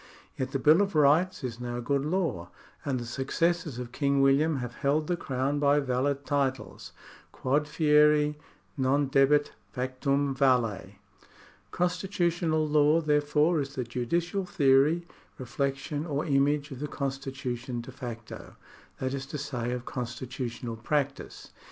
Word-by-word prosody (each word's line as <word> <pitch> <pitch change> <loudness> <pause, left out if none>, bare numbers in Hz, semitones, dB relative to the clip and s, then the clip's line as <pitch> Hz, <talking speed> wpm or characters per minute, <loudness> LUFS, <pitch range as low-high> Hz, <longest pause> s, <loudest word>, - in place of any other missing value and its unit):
Yet 130 -1 -3
the 135 - 0
Bill 155 +7 +5
of 200 -3 -1
Rights 155 +4 +3
is 120 -2 -4
now 120 0 -4
good 140 +3 0
law, 150 - -1 0.3
and 135 -3 -1
the 120 - -6
successors 140 +4 -1
of 125 -1 -6
King 140 +1 +1
William 140 +3 +3
have 125 -3 -4
held 150 +2 +1
the 175 - 0
Crown 135 -2 -2
by 145 0 +4
valid 140 +1 -1
titles. 140 -2 -2 0.4
Quod 145 +3 0
fieri 150 -1 +3 0.4
non 135 +1 +1
debet, 145 +2 +4 0.2
factum 135 +2 -1
valet. 115 -8 +1 0.7
Constitutional 175 -3 0
law, 150 +1 +4
therefore, 150 +1 +2
is 140 0 -6
the 130 - -1
judicial 170 +11 -2
theory, 145 +1 +3 0.3
reflec 135 +2 -1
tion, 145 +3 -5
or 150 +1 -2
image 145 0 +1
of 130 - -7
the 150 - -3
constitution 135 -3 -4
de 120 - -10
facto, 120 -3 -8 0.4
that 130 0 -3
is 135 0 -4
to 150 - -5
say, 125 -5 -3
of 125 0 -4
constitutional 120 -1 -5
practice. 140 +3 -3
140 Hz, 140 wpm, -28 LUFS, 130-150 Hz, 0.7 s, Bill